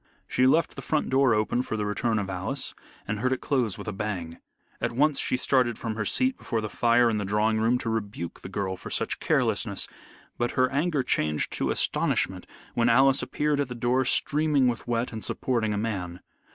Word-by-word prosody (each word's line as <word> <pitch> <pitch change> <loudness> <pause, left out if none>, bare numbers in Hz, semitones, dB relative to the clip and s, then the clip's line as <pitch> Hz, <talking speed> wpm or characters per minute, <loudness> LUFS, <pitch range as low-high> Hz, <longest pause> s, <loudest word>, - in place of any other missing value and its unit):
She 130 - +3
left 165 +5 +2
the - - -6
front 155 -4 -1
door 130 -3 +4
open 110 +3 +1
for 110 - -4
the 105 - -1
return 110 +2 0
of 100 -2 -1
Alice, 95 +9 -2 0.3
and 105 0 -2
heard 130 +3 0
it 130 - 0
close 125 -8 0
with - - -9
a 105 - -2
bang. 95 -5 -4 0.4
At - - -1
once 145 +4 +2
she - - 0
started 125 -3 +2
from 115 -2 -3
her 105 -1 -3
seat 260 - +1
before 115 - -2
the 110 -1 -4
fire 120 0 +3
in 110 -2 +1
the 105 - -1
drawing 105 +2 +1
room 115 +3 +3
to 125 - -6
rebuke 100 -6 -4
the - - -8
girl 95 -1 -2
for - - -9
such - - -2
carelessness, - - 0 0.5
but 120 0 0
her 130 0 +3
anger 145 0 +1
changed 75 -10 0
to - - -1
astonishment - - 0 0.3
when 120 0 +2
Alice 135 +3 +5
appeared 150 -1 -1
at 140 - 0
the 125 - -7
door 125 +2 +1
streaming 145 0 +2
with 120 -1 -2
wet 120 0 -1
and 110 - -4
supporting 115 -4 0
a 105 - -1
man. 95 -5 -3
115 Hz, 210 wpm, -26 LUFS, 105-130 Hz, 0.5 s, Alice